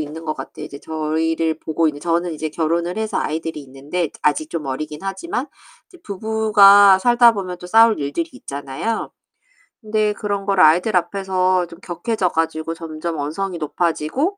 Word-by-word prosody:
있는 155 +2 -6
것 155 -1 -2
같아요. 150 - -8
이제 140 - -10
저희를 160 +1 -1
보고 160 +1 0
있는 145 -1 -5
저는 170 +2 0
이제 155 0 -4
결혼을 170 +4 -1
해서 220 -1 -2
아이들이 160 0 -3
있는데 145 +5 -4
아직 150 +1 +1
좀 160 -4 -4
어리긴 150 +3 -5
하지만. 245 - -3 0.4
이제 360 - -18
부부가 205 - +5
살다 240 +2 +5
보면 185 -4 -5
또 180 - -9
싸울 225 0 +5
일들이 145 - -2
있잖아요. 145 - -5 0.7
그런데 215 -1 0
그런 205 -2 -3
걸 195 -1 +1
아이들 175 +6 +5
앞에서 185 0 0
좀 170 0 -13
격해져 195 +2 -2
가지고 160 0 -2
점점 165 0 -5
언성이 175 +6 -3
높아지고 170 - -1
170 Hz, 365 characters per minute, -20 LUFS, 155-200 Hz, 0.7 s, 부부가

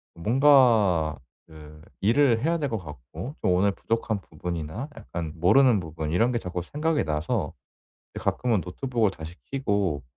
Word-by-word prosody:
뭔가 110 - +4 0.3
그 75 -1 -14 0.2
일을 115 +2 +3
해야 165 +4 +1
될 145 -4 -2
것 115 - -2
같고 75 - -9
좀 90 - +2
오늘 95 +3 +3
부족한 110 0 -2
부분이나 85 - -5
약간 85 -7 -6
모르는 110 +7 +4
부분 80 -1 -5
이런 115 +9 +2
게 120 - 0
자꾸 90 -3 -4
생각이 150 - -1
나서 75 +2 -2 0.6
이 - - -5
가끔은 120 -5 0
노트북을 115 +3 -1
다시 80 +2 -9 0.2
켜고 100 - 0
100 Hz, 295 characters per minute, -26 LUFS, 80-125 Hz, 0.6 s, 뭔가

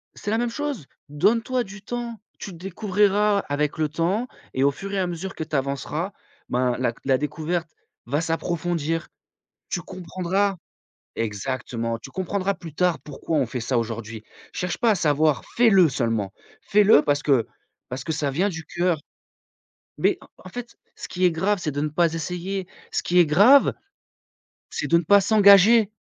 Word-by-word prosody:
c'est 205 - -4
la 225 - +2
même 240 0 0
chose! 285 - -4 0.2
«Donne 210 +11 +2
toi 255 0 0
du 195 0 -11
temps, 235 0 -5 0.2
tu 195 - -7
découvriras 200 +3 +1
avec 145 +1 -1
le 155 -1 +1
temps 185 - -1 0.3
et 130 - +1
au 140 - +4
fur 195 +7 -7
et 195 - 0
à 185 - +1
mesure 175 +3 -5
que 160 - -3
tu 155 - -15
avanceras, 140 +7 -2 0.4
ben 125 0 +1
la 125 - +1
c 115 - -20
la 135 -1 +3
découverte 165 +3 -3 0.4
va 145 +6 0
s'approfondir. 165 -1 -2 0.6
Tu 175 - -1
comprendras» 185 +3 -2 0.6
exactement 115 +1 -3
«Tu 135 - -11
comprendras 190 +2 -1
plus 165 -5 -10
tard 180 -1 +1
pourquoi 150 +2 -4
on 135 - +2
fait 125 +2 -4
ça 120 +2 -1
aujourd'hui. 115 -1 -5 0.3
Cherche 180 -1 -3
pas 235 -2 +3
à 210 - +3
savoir, 150 -3 +2
fais 240 -1 +5
le 185 -5 +6
seulement! 115 -6 -1 0.3
Fais 210 0 +3
le 195 -8 +7
parce 145 0 0
que 135 -6 +3 0.4
parce 125 +1 -5
que 160 - -3
ça 150 -2 -1
vient 185 +9 +1
du 165 -3 -6
cœur». 175 -3 0 1.0
Mais - - +2
en - - -15 0.2
en - - -8
fait, 240 +3 -8 0.2
ce - - -8
qui 185 0 0
est 180 - +5
grave 195 +5 +1
c'est 155 -4 -2
de 145 +1 -3
ne 150 - 0
pas 165 +1 +1
essayer. 180 +3 -4 0.2
Ce - - 0
qui 180 - +1
est 175 - +7
grave, 205 - +6 1.0
c'est - - -3
de 170 - +4
ne - - -3
pas 200 +4 +6
s'engager. 205 +1 +6
170 Hz, 185 wpm, -24 LUFS, 145-200 Hz, 1.0 s, le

